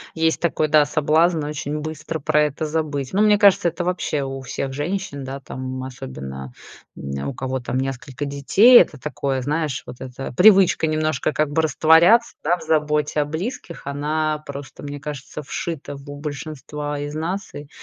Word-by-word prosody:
есть 160 Hz, 0 st, +1 dB
такой, 160 Hz, -2 st, +1 dB
да, 150 Hz, 0 st, +5 dB
соблазн: 155 Hz, +2 st, +2 dB
очень 150 Hz, 0 st, -3 dB
быстро 155 Hz, +1 st, -5 dB
про 150 Hz, +1 st, +2 dB
это 150 Hz, +1 st, -1 dB
забыть. 150 Hz, -3 st, -2 dB
Ну 200 Hz, -, +2 dB
мне 210 Hz, -1 st, +5 dB
кажется, 200 Hz, -3 st, +5 dB
это 175 Hz, +1 st, -2 dB
вообще 175 Hz, -5 st, -1 dB
у 135 Hz, 0 st, -5 dB
всех 130 Hz, +1 st, -4 dB
женщин, 145 Hz, -1 st, -3 dB
да, 135 Hz, +1 st, -6 dB
там, 130 Hz, -1 st, -6 dB
особенно, 65 Hz, -, -7 dB, 0.4 s
м, 70 Hz, 0 st, -4 dB
у -, -, -5 dB
кого 130 Hz, 0 st, -3 dB
там 125 Hz, +1 st, -3 dB
несколько 135 Hz, +1 st, -4 dB
детей, 170 Hz, -, +6 dB
это 145 Hz, -, -2 dB
такое 135 Hz, -2 st, -2 dB
знаешь, 150 Hz, -1 st, -1 dB
вот 125 Hz, -, -9 dB
это, 130 Hz, 0 st, -7 dB
привычка 190 Hz, -4 st, +6 dB
немножко 155 Hz, -3 st, 0 dB
как 150 Hz, -1 st, 0 dB
бы 160 Hz, +2 st, +2 dB
растворяться, 160 Hz, +9 st, +5 dB
да, 175 Hz, +4 st, +2 dB
в -, -, -11 dB
заботе 150 Hz, -1 st, +1 dB
о -, -, 0 dB
близких. 170 Hz, -, -5 dB
Она 150 Hz, +2 st, -1 dB
просто, 140 Hz, -2 st, -8 dB
мне 145 Hz, 0 st, -6 dB
кажется, 150 Hz, +1 st, -7 dB
вшита 160 Hz, +1 st, -5 dB
в, 140 Hz, -, -11 dB
э, 145 Hz, -, -6 dB
большинства 145 Hz, 0 st, -5 dB
из 145 Hz, +1 st, -5 dB
нас. 180 Hz, +6 st, -4 dB
И 145 Hz, 0 st, -8 dB
150 Hz, 175 wpm, -22 LUFS, 135-160 Hz, 0.4 s, детей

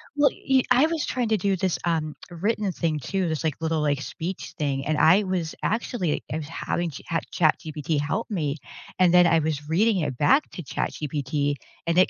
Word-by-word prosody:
Well, 290 Hz, -1 st, +5 dB, 0.2 s
y 265 Hz, -1 st, +5 dB
I 255 Hz, +3 st, +6 dB
was 325 Hz, -1 st, -1 dB
trying 250 Hz, -5 st, -1 dB
to 220 Hz, -, +3 dB
do 195 Hz, +1 st, +1 dB
this, 185 Hz, -1 st, -1 dB
um, 155 Hz, -3 st, 0 dB
written 200 Hz, +3 st, -1 dB
thing 160 Hz, -3 st, -1 dB
too, 190 Hz, +7 st, -1 dB
this, 160 Hz, -1 st, -2 dB
like, 155 Hz, -4 st, 0 dB
little, 160 Hz, -1 st, 0 dB
like, 145 Hz, -2 st, +1 dB
speech 175 Hz, +5 st, -5 dB
thing, 140 Hz, -2 st, -1 dB
and 155 Hz, -, +1 dB
I 180 Hz, +8 st, +6 dB
was 180 Hz, -4 st, -2 dB
actually, 220 Hz, -7 st, -1 dB
i 155 Hz, -, -1 dB
having 170 Hz, +1 st, -2 dB
Ch 140 Hz, -, -9 dB
had 165 Hz, -1 st, -1 dB
ChatGPT 155 Hz, -2 st, +1 dB
help 145 Hz, +12 st, -2 dB
me, 155 Hz, -8 st, -1 dB, 0.4 s
and 180 Hz, -2 st, +5 dB
then 180 Hz, 0 st, +7 dB
I 165 Hz, -1 st, +4 dB
was 150 Hz, -2 st, -2 dB
reading 200 Hz, +7 st, +3 dB
it 145 Hz, -4 st, -2 dB
back 150 Hz, -, +3 dB
to 180 Hz, -, -6 dB
ChatGPT, 145 Hz, -1 st, -2 dB, 0.3 s
and 170 Hz, -, +1 dB
it 185 Hz, -, +6 dB
165 Hz, 200 wpm, -25 LUFS, 150-195 Hz, 0.4 s, then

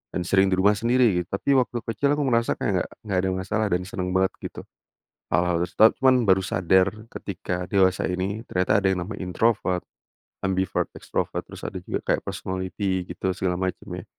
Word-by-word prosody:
Dan 90 Hz, -, 0 dB
sering 95 Hz, 0 st, +4 dB
di 95 Hz, -, +2 dB
rumah 100 Hz, +2 st, +5 dB
sendiri 120 Hz, +4 st, +3 dB, 0.2 s
gitu, 90 Hz, -, -9 dB
tapi 120 Hz, +8 st, 0 dB
waktu 125 Hz, -2 st, +2 dB
kecil 115 Hz, +6 st, 0 dB
aku 145 Hz, -, +1 dB
merasa 115 Hz, -2 st, +2 dB
kayak 95 Hz, -5 st, 0 dB
nggak -, -, -5 dB, 0.2 s
nggak 95 Hz, -2 st, 0 dB
ada 95 Hz, 0 st, 0 dB
masalah, 100 Hz, +4 st, -1 dB
dan 90 Hz, +1 st, +2 dB
seneng 90 Hz, -1 st, -4 dB
banget 95 Hz, 0 st, +3 dB
gitu. -, -, -7 dB, 0.7 s
Hal-hal 85 Hz, +1 st, +1 dB
de 90 Hz, -, +1 dB
stat 110 Hz, +1 st, +5 dB
cuman 130 Hz, -2 st, +4 dB
baru 95 Hz, -1 st, +4 dB
sadar 95 Hz, 0 st, +3 dB, 0.2 s
ketika 90 Hz, -2 st, -4 dB
dewasa 95 Hz, -1 st, +2 dB
ini, 95 Hz, +5 st, -3 dB
ternyata 90 Hz, +2 st, +2 dB
ada 95 Hz, -, 0 dB
yang 90 Hz, -2 st, 0 dB
namanya 105 Hz, +5 st, -6 dB
introvert, 95 Hz, -1 st, +1 dB, 0.6 s
ambivert, 95 Hz, -1 st, 0 dB
extrovert, -, -, -2 dB
terus -, -, -11 dB
ada -, -, -4 dB
juga -, -, -4 dB
kayak -, -, +1 dB
personality 95 Hz, 0 st, -3 dB
gitu, 95 Hz, -, -3 dB
segala 90 Hz, -1 st, -1 dB
macem 95 Hz, +3 st, -3 dB, 0.2 s
ya. -, -, -16 dB
95 Hz, 190 wpm, -25 LUFS, 90-105 Hz, 0.7 s, rumah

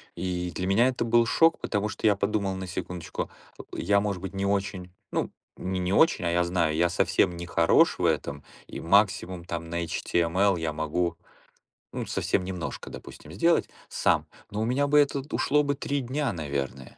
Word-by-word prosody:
И 90 Hz, 0 st, -3 dB
для 90 Hz, -, -2 dB
меня 110 Hz, +6 st, +4 dB
это 130 Hz, -2 st, -1 dB
был 120 Hz, 0 st, +4 dB
шок, 165 Hz, +7 st, +4 dB
потому 105 Hz, 0 st, -1 dB
что 110 Hz, -, -1 dB
я 105 Hz, -, +5 dB
подумал 100 Hz, -1 st, -1 dB
на 95 Hz, 0 st, -5 dB
секундочку. 90 Hz, -1 st, -5 dB, 0.4 s
Я, 100 Hz, 0 st, +2 dB
может 100 Hz, -3 st, -2 dB
быть, 95 Hz, -2 st, -6 dB
не 100 Hz, 0 st, -2 dB
очень, 100 Hz, -2 st, -1 dB, 0.2 s
ну, -, -, -1 dB, 0.3 s
не 95 Hz, 0 st, -3 dB
не 90 Hz, +1 st, -1 dB
очень, 160 Hz, -, +4 dB
а 85 Hz, -, +1 dB
я 90 Hz, +1 st, +2 dB
знаю, 85 Hz, -3 st, +1 dB
я 85 Hz, +2 st, +3 dB
совсем 90 Hz, -, +2 dB
не 85 Hz, -, -5 dB
хорош 85 Hz, -1 st, +3 dB
в -, -, +1 dB
этом, 70 Hz, 0 st, -1 dB, 0.2 s
и -, -, -7 dB
максимум 95 Hz, -1 st, +2 dB
там 85 Hz, -1 st, -5 dB
на 85 Hz, +1 st, -2 dB
HTML 85 Hz, +3 st, +1 dB
я 80 Hz, -1 st, -1 dB
могу, 80 Hz, +2 st, -1 dB, 0.8 s
ну, -, -, -3 dB
совсем -, -, 0 dB
немножко, 90 Hz, -2 st, -5 dB
допустим, 75 Hz, -, -11 dB
сделать 165 Hz, -, +2 dB, 0.2 s
сам. -, -, +1 dB, 0.2 s
Но 105 Hz, +2 st, -3 dB
у 110 Hz, -, +1 dB
меня 140 Hz, +4 st, +1 dB
бы 150 Hz, -, +4 dB
на -, -, +8 dB
это 140 Hz, -1 st, -3 dB
ушло 150 Hz, +1 st, +3 dB
бы 145 Hz, 0 st, 0 dB
3 140 Hz, +1 st, -2 dB
дня, 135 Hz, +2 st, -1 dB
наверное, 70 Hz, -5 st, -4 dB
95 Hz, 190 wpm, -27 LUFS, 85-110 Hz, 0.8 s, на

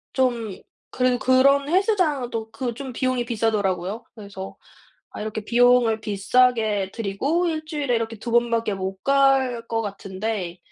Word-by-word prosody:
좀 235 Hz, -6 st, 0 dB, 0.3 s
그래도 250 Hz, -1 st, +1 dB
그런 275 Hz, +2 st, +4 dB
헬스장도 300 Hz, -, 0 dB
그 245 Hz, -3 st, -3 dB
좀 265 Hz, +1 st, -7 dB
비용이 255 Hz, 0 st, -1 dB
비싸더라고요. 210 Hz, -2 st, -1 dB
그래서 200 Hz, -3 st, -9 dB, 0.5 s
'아 -, -, -9 dB
이렇게 215 Hz, 0 st, -5 dB
비용을 240 Hz, -1 st, +4 dB
비싸게 215 Hz, -1 st, +1 dB
들이고 275 Hz, -, -1 dB
1 315 Hz, -1 st, -3 dB
주일에 295 Hz, -5 st, -1 dB
이렇게 225 Hz, -1 st, -3 dB
2 235 Hz, -, -6 dB
번밖에 230 Hz, -3 st, +2 dB
못 190 Hz, 0 st, -5 dB
갈 270 Hz, -4 st, +3 dB
것 225 Hz, 0 st, -1 dB
같은데 195 Hz, -2 st, -4 dB
235 Hz, 290 characters per minute, -23 LUFS, 210-260 Hz, 0.5 s, 그런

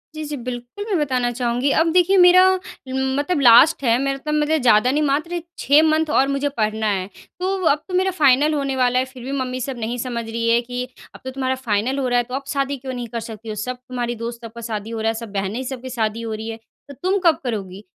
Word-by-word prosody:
जी, 310 Hz, -, -5 dB
जी 295 Hz, 0 st, -4 dB
बिल्कुल 245 Hz, -, -6 dB
मैं 415 Hz, -4 st, 0 dB
बताना 255 Hz, -4 st, 0 dB
चाहूँगी। 245 Hz, +2 st, 0 dB
अब 325 Hz, 0 st, +2 dB
देखिए 365 Hz, +3 st, +4 dB
मेरा 360 Hz, 0 st, +7 dB, 0.5 s
म 265 Hz, 0 st, -1 dB
मतलब 290 Hz, +3 st, 0 dB
लास्ट 275 Hz, +5 st, +7 dB
है। 235 Hz, -2 st, +3 dB
मेरा 275 Hz, 0 st, -1 dB
तो 300 Hz, +3 st, -5 dB
मतलब 300 Hz, 0 st, +1 dB
ज़्यादा 245 Hz, 0 st, +4 dB
नहीं 295 Hz, +3 st, +1 dB
मात्र 310 Hz, +5 st, -1 dB, 0.2 s
6 290 Hz, +2 st, +5 dB
मंथ 315 Hz, 0 st, +2 dB
और 275 Hz, -2 st, +3 dB
मुझे 275 Hz, +1 st, 0 dB
पढ़ना 215 Hz, 0 st, 0 dB
है। 190 Hz, -3 st, -1 dB, 0.3 s
तो 375 Hz, +2 st, 0 dB
अब 290 Hz, +1 st, +2 dB
तो 370 Hz, -, -8 dB
मेरा 375 Hz, +1 st, +2 dB
फ़ाइनल 295 Hz, -3 st, +3 dB
होने 275 Hz, -2 st, -1 dB
वाला 250 Hz, -1 st, +2 dB
है 255 Hz, -, 0 dB
फिर 260 Hz, -2 st, -12 dB
भी 265 Hz, -, -5 dB
मम्मी 255 Hz, 0 st, -3 dB
सब 260 Hz, +1 st, -4 dB
नहीं 235 Hz, +1 st, -3 dB
समझ 240 Hz, -1 st, -3 dB
रही 230 Hz, 0 st, -1 dB
हैं 235 Hz, +1 st, +4 dB
कि 245 Hz, +1 st, -4 dB, 0.3 s
अब -, -, -11 dB
तो -, -, -3 dB
तुम्हारा 260 Hz, 0 st, -1 dB
फ़ाइनल 255 Hz, +1 st, -1 dB
हो 265 Hz, -, 0 dB
रहा 245 Hz, 0 st, +2 dB
है 245 Hz, -, +2 dB
तो 250 Hz, +2 st, -6 dB
अब 275 Hz, -, -3 dB
शादी 275 Hz, 0 st, -1 dB
क्यों 260 Hz, 0 st, -6 dB
नहीं 245 Hz, -1 st, -5 dB
कर 230 Hz, +1 st, -4 dB
सकती 225 Hz, 0 st, -9 dB
हो? 215 Hz, -, -4 dB
सब 250 Hz, +5 st, -4 dB
तुम्हारी 240 Hz, -2 st, -3 dB
दोस्त 235 Hz, +1 st, -6 dB
सब 225 Hz, -, -8 dB
का 235 Hz, -, -8 dB
शादी 220 Hz, -2 st, -5 dB
हो 225 Hz, -1 st, -4 dB
रहा 220 Hz, -, 0 dB
है, -, -, 0 dB
सब 225 Hz, -1 st, -7 dB
बहनें 200 Hz, +5 st, -2 dB
सब 260 Hz, -1 st, -6 dB
की 260 Hz, -, -7 dB
शादी 225 Hz, -2 st, -2 dB
हो 225 Hz, -1 st, -4 dB
रही 220 Hz, +1 st, -5 dB
है, 225 Hz, -, -5 dB, 0.3 s
तो -, -, -8 dB
तुम 375 Hz, +2 st, +2 dB
कब 330 Hz, -2 st, +4 dB
करोगी? 200 Hz, -6 st, -4 dB
255 Hz, 260 wpm, -21 LUFS, 230-285 Hz, 0.5 s, मेरा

